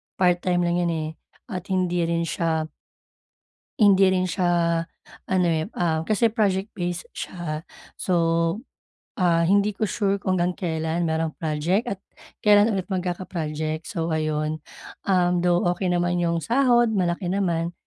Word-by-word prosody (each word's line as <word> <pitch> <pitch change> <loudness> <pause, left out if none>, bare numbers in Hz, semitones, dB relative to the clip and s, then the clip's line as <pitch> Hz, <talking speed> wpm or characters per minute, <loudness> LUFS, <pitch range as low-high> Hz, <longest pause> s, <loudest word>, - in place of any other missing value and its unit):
part 180 -2 +3
time 175 -1 +1
lang 175 0 +1
yun, 175 -1 +1
eh, 155 -1 -2 0.4
at 185 -1 -5
hindi 180 -2 0
rin 170 0 0
siya 165 -1 -1 1.2
hindi 195 -3 +6
rin 185 -1 +1
siya 170 -2 +1 0.5
ano 185 -2 +3
eh, 160 -1 +1
ah, 160 -2 +1
kasi 215 +5 +2
project-based 190 -5 -1
siya. 155 -4 -5 0.3
So, 185 - -1 1.0
ah, 170 -5 +2
hindi 200 +3 +3
ko 215 - +1
sure 200 -1 0
kung 190 -1 -1
hanggang 180 +1 0
kelan 160 -1 -2
merong 160 -1 -1
project, 160 +7 0
at 190 - -14 0.4
kelan 210 +1 +5
ulit 190 0 -3
magkaka-project. 165 -4 -3
So 165 0 -3
ayun, 155 0 -1 0.5
um, 180 -2 +2
though 175 0 +3
okey 180 0 -1
naman 175 0 +1
yung 170 -1 0
sahod, 240 - +3
malaki 175 -2 0
naman, 175 -3 0
175 Hz, 140 wpm, -24 LUFS, 165-190 Hz, 1.2 s, hindi